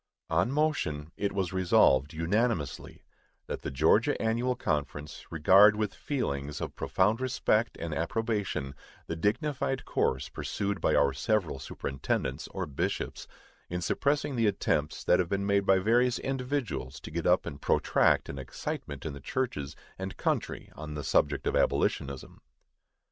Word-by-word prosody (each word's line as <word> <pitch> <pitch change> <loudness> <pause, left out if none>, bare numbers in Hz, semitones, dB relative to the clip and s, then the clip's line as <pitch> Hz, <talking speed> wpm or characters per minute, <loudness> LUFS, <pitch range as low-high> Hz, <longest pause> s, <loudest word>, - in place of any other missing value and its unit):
On 85 +9 +2
motion, 95 - 0
it 100 - -1
was 95 -3 -2
Resolved, 75 -6 +4
unanimously, 85 - -1 0.4
That - - -5
the - - -4
Georgia 80 - +3
Annual 120 +3 +1
Conference 75 - -3
regard 95 +6 +6
with 105 -2 -1
feelings 75 - -3
of - - -5
profound 105 +6 +1
respect 120 -3 +1
and 85 -2 -4
approbation 100 - -1 0.3
the 80 - -4
dignified 135 - -1
course 65 -1 0
pursued 100 -3 -3
by - - +3
our 70 -1 +4
several 85 0 0
superintendents, 65 0 -3
or - - -4
bishops, 70 -3 -3 0.4
in 90 - -2
suppressing 140 - 0
the 115 -2 +2
attempts 75 -6 0
that - - +4
have 90 -2 0
been 100 0 -1
made 100 -1 +2
by 95 - +6
various 120 +5 +3
individuals 130 - -3
to - - -8
get 85 0 -2
up 90 +1 +4
and 70 - -7
protract - - +3
an 70 - -6
excitement 70 +2 -5
in 80 - -3
the 70 - -8
churches 70 - -3 0.2
and 95 0 -5
country - - -2
on 75 -1 -7
the 75 - -4
subject 70 +2 +1
of - - 0
abolitionism. 70 -1 0
95 Hz, 150 wpm, -29 LUFS, 75-115 Hz, 0.4 s, regard